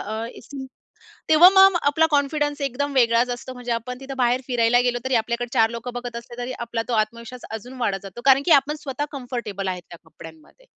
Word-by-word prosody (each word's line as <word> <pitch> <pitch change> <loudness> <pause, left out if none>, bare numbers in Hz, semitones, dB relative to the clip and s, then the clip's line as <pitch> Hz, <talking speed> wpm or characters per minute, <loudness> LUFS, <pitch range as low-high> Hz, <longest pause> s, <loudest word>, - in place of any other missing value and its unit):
अ, 220 +2 -4 1.0
तेव्हा 315 +3 +8
मग 385 -1 +7
आपला 290 +3 +3
कॉन्फिडन्स 290 0 0
एकदम 280 +1 -2
वेगळाच 240 -1 +3
असतो, 250 +1 -8
म्हणजे 245 -1 -6
आपण 250 +2 -5
तिथं 270 0 -7
बाहेर 245 0 +2
फिरायला 245 -1 +3
गेलो 245 -1 0
तरी 260 -1 +1
आपल्याकडे 235 +2 -1
4 225 -3 +4
लोकं 235 +1 -6
बघत 245 -1 -6
असले 240 +1 -11
तरी 255 - -5
आपला 235 -1 -3
तो 240 - -1
आत्मविश्वास 230 +3 -3
अजून 245 +4 -9
वाढत 195 -4 0
जातो. 195 +4 -10
कारण 270 0 +6
की 335 - +1
आपण 295 +2 -5
स्वतः 280 +1 -4
कम्फर्टेबल 240 -7 -5
आहेत 180 -1 -4
त्या 170 - -11
कपड्यांमध्ये. 165 - -15
245 Hz, 195 wpm, -23 LUFS, 230-275 Hz, 1.0 s, तेव्हा